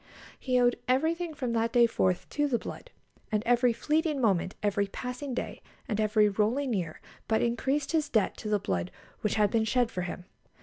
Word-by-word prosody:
He 255 -1 +1
owed 245 0 +3
everything 320 +5 +1
from 250 -4 -2
that 230 0 +1
day 240 -1 +6
forth 185 -5 0
to 295 0 0
the 250 -4 +1
blood, - - -8 0.4
and 210 -1 +1
every 245 0 +4
fleeting 305 +5 0
moment, 195 -6 +1
every 200 -1 +1
passing 250 +5 -5
day, - - -4 0.3
and 215 -1 -1
every 215 0 +4
rolling 230 +6 0
year 175 -6 -3 0.3
but 220 - +2
increased 265 +5 0
his 315 -2 +1
debt 220 -4 +1
to 215 - -5
the 210 - +3
blood 90 - -2 0.3
which 210 - -1
had 210 -2 +3
been 225 -1 +2
shed 240 +1 +1
for 180 - -3
him. 175 0 -5
235 Hz, 190 wpm, -29 LUFS, 210-265 Hz, 0.4 s, day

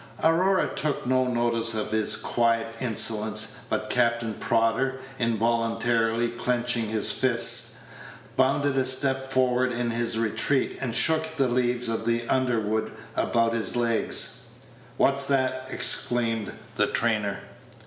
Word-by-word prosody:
Aurora 185 +4 +3
took 150 -4 -2
no 130 0 +1
notice 120 -2 0
of 110 0 -3
his 110 -1 +2
quiet 115 -1 0
insolence; 110 -2 +1
but - - -2
Captain 115 -1 +1
Prodder, 115 +5 0 0.2
involuntarily 115 0 0
clenching 120 -1 -1
his 110 -1 0
fist, 125 -3 +1 0.6
bounded 140 +1 +1
a 130 - +3
step 135 0 +1
forward 130 -1 +1
in 120 0 -2
his 115 0 -2
retreat, 115 +4 0
and 120 -3 -3
shook 160 +3 +3
the 135 -4 +1
leaves 125 0 -1
of 115 0 -3
the 120 0 0
underwood 115 -4 0 0.2
about 115 -1 +1
his 115 0 -2
legs. 115 -1 +1 0.5
"What's 140 0 +4
that?" 130 -1 0
exclaimed 115 -5 0 0.3
the 105 - +3
trainer. 105 -4 0
120 Hz, 125 wpm, -25 LUFS, 115-130 Hz, 0.6 s, What's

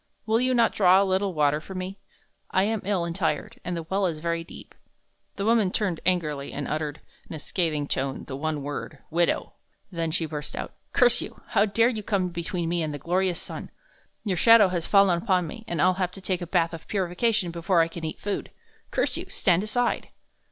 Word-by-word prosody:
"Will 225 +2 +2
you 255 0 +2
not 235 -2 +4
draw 185 -2 +6
a 200 - +3
little 190 -1 0
water 150 0 +2
for 190 +5 -9
me? 185 +2 -5 0.5
I 190 - +2
am 220 +1 0
ill 190 -3 0
and 170 -1 -4
tired, 225 +7 -2
and 175 -1 -3
the 165 - -4
well 190 +4 0
is 165 -3 -3
very 170 +1 -2
deep." - - -12 0.6
The 200 - -3
woman 225 -3 +4
turned 185 -4 -1
angrily, 150 -6 0
and 145 -1 -4
uttered, 150 -1 -3 0.3
in - - -5
a - - -6
scathing 155 -2 -1
tone, 135 -1 -2
the 135 - -6
one 150 0 -2
word, 145 +1 -5
"Widow!" 170 +1 +1 0.4
then 165 -2 -1
she 165 +1 0
burst 150 -1 -6
out: - - -5 0.2
"Curse - - +5
you! - - -8
How 210 -2 +4
dare 225 +4 +3
you 220 -4 -3
come 195 -3 0
between 170 0 -3
me 170 0 0
and 155 -1 -2
the - - -4
glorious 180 +4 0
sun! - - -7 0.5
Your 195 -5 -1
shadow 230 0 +7
has 175 -3 -2
fallen 195 -4 +5
upon 185 -2 +2
me, 220 +8 -8
and 170 - -3
I'll 185 +4 +5
have 180 - +1
to 195 - -9
take 185 -1 -1
the 175 - -5
bath 170 -1 +1
of 165 - -8
purification 195 0 0
before 170 +1 +2
I 165 - +3
can 165 0 -8
eat 155 - -4
food! 205 -1 -3 0.4
Curse - - 0
you! - - -6
Stand 180 -1 +2
aside!" 240 +4 0
180 Hz, 215 wpm, -26 LUFS, 165-200 Hz, 0.6 s, shadow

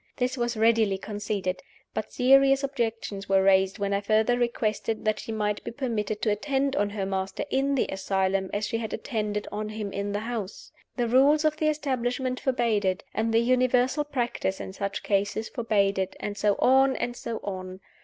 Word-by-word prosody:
This 255 0 0
was 240 -2 -2
readily 220 -3 +3
conceded. 200 -2 -3 0.3
But - - -4
serious 270 +1 +5
objections 225 -7 -3
were 195 0 +4
raised 190 0 +4
when 200 -1 -1
I 200 - +1
further 215 +3 +2
requested 225 -2 -1
that 215 -1 +1
she - - -6
might 210 -1 -1
be - - -4
permitted 225 -5 -3
to 215 - +3
attend 275 +5 0
on 205 -6 +1
her 200 -1 -3
master 190 +3 -3
in 275 +1 +1
the 265 - +2
asylum 190 0 0
as 205 +1 -1
she 225 - -2
had 220 -2 -4
attended 210 -2 -3
on 210 +1 -3
him 215 -2 -5
in 200 +1 -2
the 205 +1 -2
house. 225 -4 -5 0.3
The 240 -1 +1
rules 280 +6 +4
of 310 0 +2
the 310 - +1
establishment 255 -3 -1
forbade 235 -5 +1
it, 185 0 0
and 225 +1 0
the 225 +1 +4
universal 255 +3 +2
practice 240 -8 -2
in 190 - -6
such 200 +1 -4
cases 205 +2 0
forbade 200 -4 +1
it, 190 0 -2
and 205 - -4
so 205 0 +2
on, 265 +1 +4
and 240 - -3
so 230 -2 -4
on. 185 -1 -6
220 Hz, 190 wpm, -27 LUFS, 200-250 Hz, 0.3 s, serious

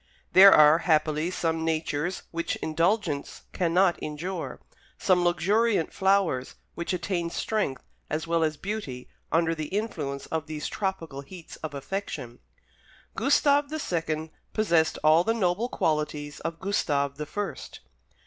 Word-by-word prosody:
There 195 +1 +10
are, 155 0 +7
happily, 155 -1 +1
some 165 -3 -1
natures 160 +1 -1
which 170 0 -2
indulgence 165 -1 -1
cannot 180 +1 +2
injure; 170 +5 -5 0.4
some 180 -2 +3
luxuriant 195 +3 +2
flowers 190 -9 +1 0.2
which 170 - -4
attain 175 -1 -1
strength 170 -8 -2 0.3
as 155 +1 -2
well 165 0 +1
as 155 -1 0
beauty 195 -12 -5 0.2
under 165 0 +2
the 155 -2 -4
influence 155 -10 -3
of 160 -1 -3
these 155 -1 -4
tropical 165 -8 -3
heats 170 +4 -11
of 155 -2 -6
affection. 140 -5 -5 0.8
Gustave 285 +3 +3
the 310 - -3
second 160 - -2 0.2
possessed 170 -7 +2
all 155 +2 +6
the 225 +4 +1
noble 205 +3 0
qualities 150 -4 -1
of 165 0 -5
Gustave 140 -8 0
the 150 - -4
first. 205 +4 -5
165 Hz, 130 wpm, -27 LUFS, 155-190 Hz, 0.8 s, There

